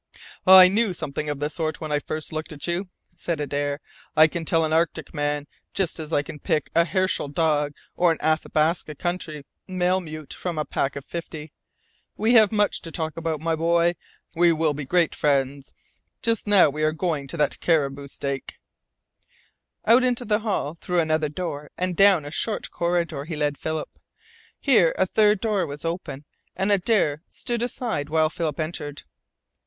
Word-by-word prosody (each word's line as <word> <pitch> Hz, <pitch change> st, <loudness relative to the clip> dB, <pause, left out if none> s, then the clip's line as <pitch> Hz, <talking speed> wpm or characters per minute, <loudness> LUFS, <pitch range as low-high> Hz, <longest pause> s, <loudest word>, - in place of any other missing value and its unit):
"I 185 Hz, 0 st, +11 dB
knew 200 Hz, 0 st, +1 dB
something 150 Hz, -1 st, -4 dB
of 145 Hz, -1 st, -3 dB
the 145 Hz, -, 0 dB
sort 160 Hz, -2 st, -3 dB
when 155 Hz, -2 st, -5 dB
I 150 Hz, -, +2 dB
first 155 Hz, +1 st, -5 dB
looked 155 Hz, +1 st, -4 dB
at 145 Hz, -2 st, -6 dB
you," 175 Hz, +2 st, -2 dB, 0.3 s
said 170 Hz, -2 st, -3 dB
Adare. 145 Hz, 0 st, -2 dB, 0.4 s
"I 155 Hz, -, +9 dB
can 165 Hz, +1 st, -3 dB
tell 165 Hz, 0 st, +2 dB
an 155 Hz, -, -1 dB
Arctic 165 Hz, +1 st, 0 dB
man, 145 Hz, -1 st, -1 dB, 0.3 s
just 190 Hz, -5 st, 0 dB
as 155 Hz, 0 st, -6 dB
I 145 Hz, -, +2 dB
can 150 Hz, -, -9 dB
pick 150 Hz, +1 st, -1 dB
a 170 Hz, 0 st, +4 dB
Herschel 185 Hz, -1 st, 0 dB
dog 150 Hz, -1 st, +1 dB, 0.2 s
or 175 Hz, -1 st, +4 dB
an 165 Hz, -, -1 dB
Athabasca 155 Hz, 0 st, 0 dB
country 165 Hz, -4 st, -4 dB, 0.2 s
malemute 180 Hz, -5 st, -2 dB
from 175 Hz, -3 st, -4 dB
a 150 Hz, -, -1 dB
pack 140 Hz, -, -1 dB
of 140 Hz, -, -7 dB
fifty. 160 Hz, -3 st, -7 dB, 0.6 s
We 220 Hz, +3 st, +2 dB
have 220 Hz, -3 st, +7 dB
much 210 Hz, -1 st, +1 dB
to 165 Hz, -, -8 dB
talk 160 Hz, -1 st, -3 dB
about, 165 Hz, -2 st, -3 dB
my 165 Hz, 0 st, 0 dB
boy. 170 Hz, +1 st, +2 dB, 0.4 s
We 175 Hz, 0 st, +4 dB
will 160 Hz, -2 st, +1 dB
be 145 Hz, 0 st, -5 dB
great 170 Hz, +3 st, +2 dB
friends. 140 Hz, -1 st, 0 dB, 0.5 s
Just 230 Hz, -2 st, 0 dB
now 195 Hz, -7 st, +6 dB
we 150 Hz, +2 st, -5 dB
are 155 Hz, 0 st, +2 dB
going 160 Hz, -4 st, -2 dB
to 170 Hz, -, -6 dB
that 150 Hz, -, 0 dB
caribou 140 Hz, -4 st, 0 dB
steak." 140 Hz, -1 st, -5 dB, 1.3 s
Out 235 Hz, +4 st, +6 dB
into 245 Hz, -1 st, +1 dB
the 210 Hz, -1 st, +2 dB
hall, 190 Hz, -8 st, -2 dB
through 180 Hz, -1 st, 0 dB
another 155 Hz, -2 st, +1 dB
door, 150 Hz, -3 st, -5 dB
and 180 Hz, -1 st, -1 dB
down 195 Hz, -5 st, +5 dB
a 145 Hz, -, -7 dB
short 210 Hz, +6 st, -3 dB
corridor, 170 Hz, -4 st, -1 dB
he 160 Hz, 0 st, -5 dB
led 145 Hz, -1 st, 0 dB
Philip. 160 Hz, +2 st, -5 dB, 0.6 s
Here 220 Hz, -, +4 dB
a 190 Hz, -, +3 dB
third 210 Hz, +1 st, +3 dB
door 205 Hz, -6 st, 0 dB
was 145 Hz, +2 st, -7 dB
open, 155 Hz, -4 st, -4 dB, 0.3 s
and 195 Hz, +2 st, 0 dB
Adare 190 Hz, -7 st, +2 dB
stood 240 Hz, -1 st, -4 dB
aside 230 Hz, -, -2 dB
while 155 Hz, 0 st, +2 dB
Philip 160 Hz, -4 st, -3 dB
entered. 150 Hz, -2 st, -5 dB
160 Hz, 180 wpm, -24 LUFS, 150-180 Hz, 1.3 s, I